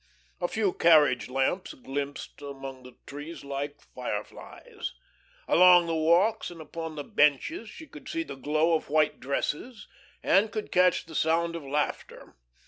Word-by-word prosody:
A 175 - 0
few 205 -1 0
carriage 150 -8 +4
lamps 135 +8 -1
glimpsed 140 +2 -6
among 135 -2 -8
the 125 0 -14
trees 145 +2 -8
like 140 +1 -5
fireflies. 460 -3 -7 0.5
Along 180 -1 +7
the 165 - -2
walks 170 +8 +2
and 175 -1 -11
upon 160 0 -7
the 145 - -5
benches 150 - +1
she 320 - -11
could - - -12
see 330 0 -2
the - - -8
glow 155 +5 +1
of 160 - -1
white 155 0 +2
dresses 150 - -3 0.4
and 210 +3 +3
could 215 0 -5
catch 180 0 +3
the 165 - -12
sound 165 +2 +1
of 165 - -5
laughter. 145 +2 -3
160 Hz, 150 wpm, -28 LUFS, 145-180 Hz, 0.5 s, Along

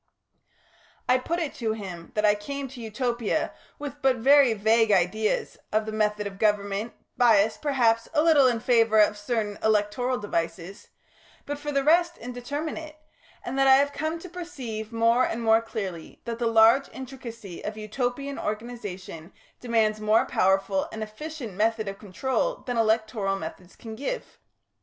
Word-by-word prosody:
I 255 +1 +4
put 330 +7 -2
it 325 -5 -3
to 225 -3 -1
him 185 -6 -8
that 210 0 +2
I 205 - +6
came 275 +7 -5
to 250 -1 -10
Utopia 235 0 -1 0.2
with 290 0 -7
but 265 -1 +3
very 270 +2 +5
vague 220 +1 +3
ideas 200 +3 +1
of 215 0 +1
the 220 - -4
method 210 -1 0
of 195 -1 -7
government, 205 +1 0 0.2
biassed, 220 -3 +4
perhaps, 240 -6 +2
a 300 - +4
little 305 -5 +6
in 240 -2 +1
favour 225 -3 +3
of 210 0 +5
certain 210 -1 -2
electoral 220 +4 +1
devices, 175 -1 -4 0.6
but 290 0 -4
for 295 0 -4
the 275 -1 +1
rest 340 +4 +3
indeterminate, 290 +6 -5 0.5
and 265 +2 -3
that 270 - +4
I 265 - +8
have 285 +1 +2
come 315 +2 -2
to 365 - -8
perceive 265 -12 -6
more 230 +2 +3
and 235 -1 -2
more 225 0 +5
clearly 195 -8 -6
that 230 -1 -4
the 235 - +1
large 230 +4 +5
intricacy 235 -8 -9
of 210 +1 -5
Utopian 245 +6 -3
organisation 205 -6 -6 0.3
demands 220 -3 +1
more 215 +1 +3
powerful 195 0 +1
and 220 - -4
efficient 240 +1 -7
method 220 +2 0
of 195 0 -5
control 265 - -2
than 245 - -2
electoral 220 -3 +1
methods 180 +1 -9
can 225 -2 -9
give. 285 - -5
225 Hz, 160 wpm, -26 LUFS, 210-265 Hz, 0.6 s, I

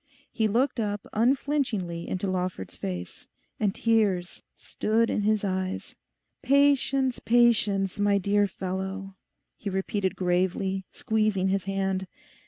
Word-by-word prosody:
He 220 -2 +1
looked 240 +5 +1
up 205 -2 -2
unflinching 250 -3 +1 0.2
into 185 +1 -2
Lawford's 185 - -3
face, 90 -2 -6 0.3
and 205 -2 +1
tears 205 -6 +1 0.2
stood 225 +2 0
in - - 0
his 215 0 +1
eyes. 190 -1 -3 0.5
'Patience, 275 -1 +3
patience, 210 -5 +3
my 205 0 +3
dear 205 +1 +2
fellow,' 190 +1 -5 0.4
he 205 - -4
repeated 190 0 -1
gravely, 185 +1 0
squeezing 215 -3 0
his 195 0 0
hand. 195 -1 -1
200 Hz, 115 wpm, -27 LUFS, 190-225 Hz, 0.5 s, Patience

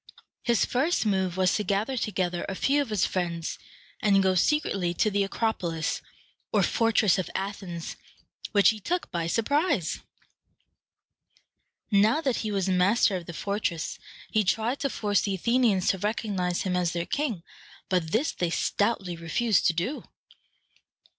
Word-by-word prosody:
His 235 -5 +2
first 275 +3 +1
move 190 -3 0
was 185 -1 +3
to 210 - 0
gather 210 +6 0
together 185 -7 -1
a 195 - -3
few 280 +8 +2
of 280 - -3
his 210 -4 +1
friends, 170 -3 -3 0.4
and 195 -2 +4
go 190 0 +3
secretly 185 - +1
to 215 - +2
the 200 0 +2
Acropolis, 190 -6 -2 0.5
or - - +3
fortress 220 -4 +3
of 185 - -3
Athens, 190 -4 -5 0.5
which 205 -2 +5
he 220 - -1
took 350 - -2
by 170 -1 -2
surprise. 280 - +1 1.9
Now 210 +7 +4
that 270 -6 0
he 220 - -2
was 195 -2 0
master 190 +3 +3
of 175 -2 -5
the 170 - -6
fortress, 200 -3 -3 0.3
he 215 - +3
tried 225 +7 0
to 275 - 0
force 205 -5 +1
the 200 -2 -1
Athenians 225 -2 +2
to 190 - +1
recognize 200 -4 -1
him 185 -2 -1
as 175 -2 0
their 170 0 -2
king, 240 - -2 0.4
but 175 -4 0
this 275 +9 +1
they 175 - -2
stoutly 195 0 0
refused 180 +7 +1
to 170 - +3
do. 185 - -2
200 Hz, 155 wpm, -27 LUFS, 180-225 Hz, 1.9 s, which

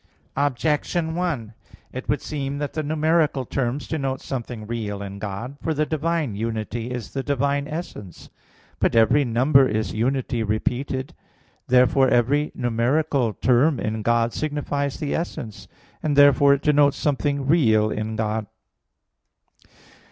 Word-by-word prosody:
Objection 150 +4 0
1: 155 -11 -2 0.4
It 130 - -7
would 145 - 0
seem 140 -2 -3
that 145 0 -4
the 155 - -1
numeral 155 -2 +1
terms 130 +3 -2
denote 135 -4 -2
something 120 -4 -6
real 105 -3 -4
in 100 0 -7
God. 105 +7 -6
For 160 - -1
the 155 +1 +1
divine 155 -4 -1
unity 115 +2 -3
is 125 -3 -5
the 135 - -1
divine 140 +1 0
essence. 150 - -8 0.5
But - - +1
every 115 +6 +5
number 130 +3 +4
is 110 -3 -2
unity 125 +1 -1
repeated. 125 +5 -2 0.5
Therefore 125 +1 +4
every 130 +5 +2
numeral 125 +1 +1
term 130 +5 +2
in 110 0 -2
God 115 +1 +1
signifies 145 -2 -2
the 145 - -3
essence; 120 -10 -5 0.3
and 150 -2 0
therefore 140 0 +6
it 140 - -8
denotes 145 -1 +4
something 140 -1 0
real 110 -9 +3
in 110 +1 -3
God. 110 -1 -2
135 Hz, 135 wpm, -23 LUFS, 115-145 Hz, 0.5 s, therefore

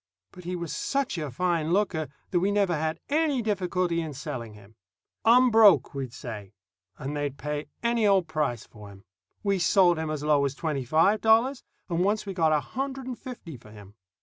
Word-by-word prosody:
But 180 -1 -13
he 180 +1 -3
was 170 -3 -5
such 275 -10 -1
a 150 -2 -3
fine 165 +3 -1
looker 180 -6 0 0.2
that 175 - +2
we 195 +3 +1
never 200 -4 +2
had 160 +1 -2
any 295 -4 +1
difficulty 180 -4 0
in 155 -3 -6
selling 115 -5 -6
him. 105 +1 -17 0.5
"Unbroke," 225 -6 +6
we'd 135 -3 -5
say, 110 -5 -8 0.4
and 140 +3 -5
they'd 145 -2 -3
pay 150 0 -4 0.2
any 235 -2 +2
old 190 -4 +3
price 150 -8 -2
for 105 -2 -13
him. 100 0 -15 0.4
We 200 -2 +1
sold 175 -1 +4
him 160 -1 -3
as 150 -1 -3
low 150 -2 +3
as 140 -1 -1
twenty 145 -5 -3
five 165 - +3
dollars, 230 +5 +3 0.3
and 170 -2 -2
once 210 +3 0
we 195 - -5
got 165 -4 +2
a 150 -1 +2
hundred 270 - -5
and 255 -1 -4
fifty 195 - -9
for 110 - -17
him. 105 -2 -14
170 Hz, 195 wpm, -27 LUFS, 145-205 Hz, 0.5 s, Unbroke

